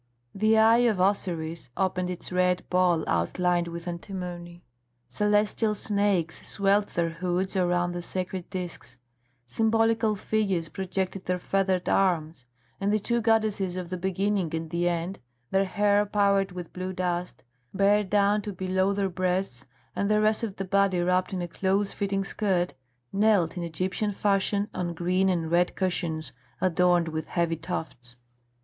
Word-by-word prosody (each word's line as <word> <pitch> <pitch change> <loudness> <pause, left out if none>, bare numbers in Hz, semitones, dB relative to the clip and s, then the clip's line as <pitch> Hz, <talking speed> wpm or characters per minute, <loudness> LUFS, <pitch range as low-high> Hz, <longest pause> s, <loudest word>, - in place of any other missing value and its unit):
The 215 +2 +3
eye 225 +2 +6
of 205 -4 -1
Osiris 170 -6 -1
opened 185 -1 0
its 180 0 -5
red 180 0 +1
ball 180 -3 +3
outlined 175 - +1
with 170 +1 -7
antimony. 175 -1 -6 0.4
Celestial 210 +1 +1
snakes 200 -5 0
swelled 200 +1 +2
their 170 -1 -1
hoods 180 +3 -2
around 175 -1 +1
the 175 0 -4
sacred 185 0 -4
discs; 175 -10 -6 0.5
symbolical 225 - +2
figures 195 -5 -1
projected 190 +2 -3
their 180 0 0
feathered 190 0 0
arms; 160 -8 +1 0.3
and 200 +1 0
the 215 - +3
two 235 +3 -1
goddesses 215 -5 +1
of 180 -1 -5
the - - -1
Beginning 190 -1 -1
and 160 0 -5
the 175 0 +1
End, 175 +3 -3 0.3
their 195 0 +3
hair 205 +1 +2
powdered 200 -1 +2
with 180 -2 -8
blue 185 +1 -4
dust, 180 -1 -3 0.3
bare 200 +2 +3
down 205 +1 +2
to 205 - -5
below 190 +1 0
the 200 -1 0
breasts 185 -7 -2 0.3
and 200 - 0
the 210 0 +3
rest 215 0 +2
of 215 -4 -3
the 195 - -4
body 195 -1 +2
wrapped 180 +2 +1
in 185 -2 -2
a - - -3
close 195 +3 0
fitting 195 -1 -1
skirt, 185 -5 0 0.4
knelt 200 -5 +3
in 180 - -4
Egyptian 185 +5 -2
fashion 200 0 +1
on 175 -2 -3
green 185 +3 +1
and 165 -3 -1
red 175 +1 +2
cushions 170 -5 -2 0.3
adorned 180 -1 +3
with 160 0 -4
heavy 170 -1 0
tufts. 135 -7 -6
185 Hz, 155 wpm, -27 LUFS, 175-200 Hz, 0.5 s, eye